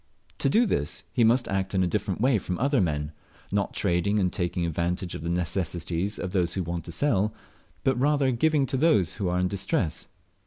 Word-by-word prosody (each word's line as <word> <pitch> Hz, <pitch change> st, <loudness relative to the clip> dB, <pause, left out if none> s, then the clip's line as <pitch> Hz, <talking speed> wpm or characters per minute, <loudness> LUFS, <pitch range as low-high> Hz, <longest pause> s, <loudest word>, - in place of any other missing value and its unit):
To 135 Hz, -, +2 dB
do 230 Hz, -, +4 dB
this 95 Hz, -, -2 dB
he 120 Hz, -, +3 dB
must 120 Hz, +2 st, +3 dB
act 95 Hz, 0 st, -1 dB
in 95 Hz, -, +3 dB
a -, -, +2 dB
different 95 Hz, 0 st, -2 dB
way 125 Hz, -3 st, +3 dB
from 90 Hz, -1 st, -4 dB
other 140 Hz, -1 st, +2 dB
men, 75 Hz, -3 st, -1 dB, 0.4 s
not 100 Hz, 0 st, 0 dB
trading 100 Hz, +2 st, +1 dB
and 90 Hz, -2 st, +1 dB
taking 85 Hz, 0 st, -1 dB
advantage 85 Hz, +2 st, -2 dB
of -, -, -6 dB
the 85 Hz, -, -3 dB
necessities 90 Hz, +2 st, -1 dB
of 90 Hz, -, -4 dB
those 90 Hz, -3 st, 0 dB
who 95 Hz, -, -1 dB
want 85 Hz, -1 st, -4 dB
to -, -, -6 dB
sell, 105 Hz, -, +1 dB, 0.5 s
but 130 Hz, -2 st, +1 dB
rather 140 Hz, -1 st, +3 dB
giving 145 Hz, +3 st, +2 dB
to 135 Hz, 0 st, -2 dB
those 105 Hz, -, +3 dB
who 95 Hz, -, +1 dB
are 90 Hz, -, 0 dB
in 90 Hz, -, +2 dB
distress. 100 Hz, -, -1 dB
95 Hz, 205 wpm, -26 LUFS, 85-125 Hz, 0.5 s, do